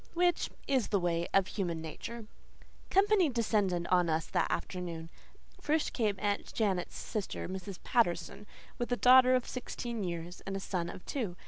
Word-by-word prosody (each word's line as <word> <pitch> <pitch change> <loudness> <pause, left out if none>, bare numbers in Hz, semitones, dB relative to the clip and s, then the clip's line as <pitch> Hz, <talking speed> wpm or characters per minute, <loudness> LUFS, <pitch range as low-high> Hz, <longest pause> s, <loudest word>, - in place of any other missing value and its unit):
Which 350 0 +2 0.2
is 260 -5 +2
the 200 - +2
way 170 -1 0
of 195 -1 +4
human 175 -5 -2
nature. 220 +8 -7 0.6
Company 390 -3 +4
descended 205 -7 +1
on 180 -2 +4
us 160 0 +1
that - - 0
afternoon. 170 -3 -4 0.5
First 305 +1 +1
came 215 -4 +1
Aunt 205 +1 -1
Janet's 195 -5 -1
sister, 215 -4 -4
Mrs. 190 0 -6
Patterson, 205 -2 0 0.3
with 240 0 -2
a 245 - +2
daughter 255 +1 +7
of 250 - 0
sixteen 240 -3 -4
years 175 0 -5
and 195 0 -2
a - - -3
son 180 -3 -2
of - - -9
two. 220 -11 -3
200 Hz, 160 wpm, -32 LUFS, 175-245 Hz, 0.6 s, daughter